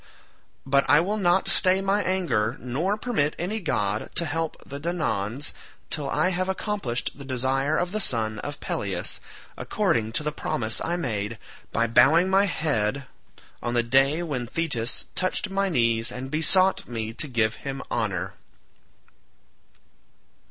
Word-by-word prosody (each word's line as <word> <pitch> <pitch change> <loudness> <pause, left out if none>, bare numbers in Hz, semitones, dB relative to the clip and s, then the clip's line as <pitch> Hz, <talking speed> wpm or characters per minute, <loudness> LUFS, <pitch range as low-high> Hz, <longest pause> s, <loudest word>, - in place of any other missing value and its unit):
But 140 +1 +2
I 145 - +7
will 205 +6 0
not 190 0 +3
stay 190 -1 +4
my 195 +1 +1
anger, 165 - 0
nor 160 - -1
permit 210 -11 0
any 195 +6 -2
god 105 - -1
to 170 - +4
help 160 +1 -2
the 140 +1 -7
Danaans 145 - -2 0.4
till 145 -3 -1
I 185 - +2
have 185 +1 -1
accomplished 190 - -2
the 140 - -11
desire 135 +2 0
of 175 0 -1
the 215 +1 -1
son 110 - +1
of - - -5
Peleus, - - -3 0.4
according 110 -2 0
to 150 - +1
the 150 - -1
promise 110 -6 -2
I 170 - 0
made 110 -9 -2 0.3
by 115 - +2
bowing 165 +10 +5
my 195 +1 +5
head 140 - 0 0.6
on 120 0 -2
the 120 - +3
day 135 +7 +3
when 130 -7 -3
Thetis 125 -6 +1
touched 185 +2 0
my 195 0 +1
knees 115 -6 +1
and 130 +2 -6
besought 185 +5 +3
me 115 -2 -4
to 150 - -4
give 115 -4 0
him 135 -1 -5
honour." 105 -7 -1
140 Hz, 150 wpm, -25 LUFS, 120-180 Hz, 0.6 s, I